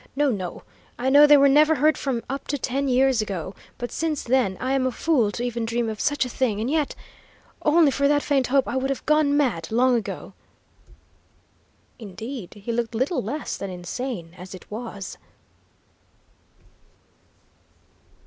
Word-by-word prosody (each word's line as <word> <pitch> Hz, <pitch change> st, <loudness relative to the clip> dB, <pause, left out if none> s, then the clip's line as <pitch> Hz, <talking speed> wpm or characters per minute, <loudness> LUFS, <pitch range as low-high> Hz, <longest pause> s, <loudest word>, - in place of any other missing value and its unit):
"No, 290 Hz, -1 st, +2 dB
no. 185 Hz, -5 st, -5 dB, 0.3 s
I 260 Hz, +2 st, 0 dB
know 290 Hz, +2 st, +8 dB
they 295 Hz, 0 st, +8 dB
were 280 Hz, 0 st, +6 dB
never 305 Hz, +3 st, +5 dB
heard 305 Hz, +2 st, +3 dB
from 255 Hz, -4 st, -2 dB
up 275 Hz, +1 st, -5 dB
to 285 Hz, -, -1 dB
ten 275 Hz, +2 st, -2 dB
years 260 Hz, -2 st, +3 dB
ago, 190 Hz, -3 st, -4 dB, 0.2 s
but 245 Hz, -1 st, -5 dB
since 315 Hz, -3 st, -2 dB
then 240 Hz, -7 st, +1 dB
I 260 Hz, +1 st, -1 dB
am 265 Hz, -1 st, +1 dB
a -, -, -1 dB
fool 250 Hz, -5 st, +1 dB
to 240 Hz, -, -4 dB
even 240 Hz, -1 st, -2 dB
dream 230 Hz, 0 st, -1 dB
of 215 Hz, -1 st, -6 dB
such 290 Hz, -2 st, +1 dB
a -, -, -5 dB
thing, 235 Hz, -5 st, -1 dB
and 235 Hz, +5 st, -1 dB
yet, 305 Hz, -2 st, 0 dB, 0.7 s
only 305 Hz, -1 st, +4 dB
for 280 Hz, +1 st, +1 dB
that 290 Hz, 0 st, +2 dB
faint 275 Hz, -3 st, +1 dB
hope 270 Hz, +1 st, +2 dB
I -, -, -3 dB
would 265 Hz, +1 st, -1 dB
have 275 Hz, -, -3 dB
gone 305 Hz, -2 st, +3 dB
mad 220 Hz, -, 0 dB
long 250 Hz, +3 st, +3 dB
ago!" 225 Hz, -4 st, -4 dB, 1.7 s
Indeed, 220 Hz, +1 st, -8 dB
he 235 Hz, -, -1 dB
looked 235 Hz, 0 st, -2 dB
little 260 Hz, +9 st, 0 dB
less 290 Hz, +9 st, -4 dB
than 195 Hz, -, -5 dB
insane 180 Hz, 0 st, -5 dB
as 185 Hz, +1 st, -9 dB
it 185 Hz, -, -15 dB
was. 215 Hz, -3 st, -7 dB
255 Hz, 170 wpm, -24 LUFS, 225-280 Hz, 1.7 s, know